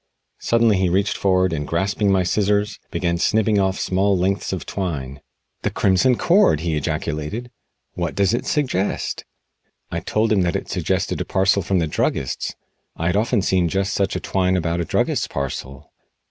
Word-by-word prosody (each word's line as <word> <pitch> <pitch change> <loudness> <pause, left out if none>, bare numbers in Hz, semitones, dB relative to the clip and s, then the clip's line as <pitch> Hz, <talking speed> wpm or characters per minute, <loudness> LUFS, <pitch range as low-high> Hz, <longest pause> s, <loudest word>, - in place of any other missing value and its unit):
Suddenly 115 -4 +3
he 95 -1 +2
reached 100 +4 +1
forward, 95 -2 +2
and 75 -2 -3
grasping 100 +4 0
my 95 -1 +3
scissors, 105 +2 0
began 85 -1 -1
snipping 110 +2 +2
off 95 0 0
small 95 +1 +1
lengths 95 +2 0
of 95 - -3
the - - -10
twine. 70 -8 -4 0.4
"The - - 0
Crimson 100 +7 +3
Cord!" 170 - +4
he 85 -2 -1
ejaculated. 75 - -3 0.4
"What - - -3
does 100 0 +2
it 120 - -2
suggest?" 130 -10 -1 0.7
I - - -1
told 110 0 0
him 100 -3 +3
that 85 -2 0
it - - -3
suggested - - -1
a - - -2
parcel 95 +1 +2
from 95 +2 0
the 85 - +2
druggist's. 70 -4 -2 0.4
I 85 - -4
had 90 +2 +1
often 110 0 +1
seen 90 -3 +2
just 95 +3 -1
such 100 -2 0
twine 95 -1 +1
about 85 0 -1
a - - -2
druggist's - - 0
parcel. 70 +1 -5
95 Hz, 175 wpm, -21 LUFS, 85-100 Hz, 0.7 s, Cord